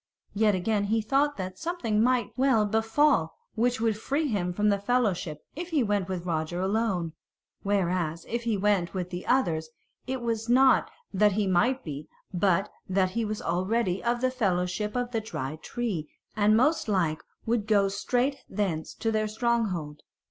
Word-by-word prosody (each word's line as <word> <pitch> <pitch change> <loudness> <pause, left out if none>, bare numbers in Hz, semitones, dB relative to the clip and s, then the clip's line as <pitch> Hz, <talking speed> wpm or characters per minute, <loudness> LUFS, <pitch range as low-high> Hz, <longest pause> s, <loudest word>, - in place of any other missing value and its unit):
Yet 210 -1 +3
again 205 +2 0
he 220 +2 +1
thought 275 +7 +1
that 185 -1 -5
something 250 -12 -1
might 240 -2 +2
well 255 -4 +3
befall 220 - +2 0.2
which 240 +1 +1
would 225 -1 +1
free 290 +7 0
him 190 -7 -1
from 210 +4 +1
that 200 -1 0
fellowship 200 -10 0
if 345 +3 -5
he 305 -6 +2
went 205 -3 0
with 180 -2 -3
Roger 165 0 -2
alone; 190 -4 0 0.5
whereas 180 -5 0
if 235 +1 -2
he 230 -3 0
went 195 -3 +1
with 180 -1 -3
the 180 0 -6
others 165 -12 +1 0.4
it 260 -1 -2
was 225 -1 -2
not 260 +2 +5 0.2
that 205 +1 +4
he 210 +1 +1
might 240 +9 +2
be, 150 -1 -6 0.3
but 190 +2 +2 0.2
that 185 -1 +2
he 230 +4 -1
was 215 -1 -3
already 185 +3 0
of 240 0 0
the 255 0 +2
fellowship 200 -2 -1
of 245 0 -1
the 225 -2 -1
Dry 150 -9 -5
Tree, 185 -3 -4 0.3
and 210 +1 +4
most 300 +5 +2
like 170 -7 +1 0.2
would 225 -2 0
go 200 -2 +4
straight 245 +7 0
thence 175 -7 -2
to 225 - -1
their 215 -1 +1
stronghold. 210 -10 -1
210 Hz, 170 wpm, -27 LUFS, 180-235 Hz, 0.5 s, not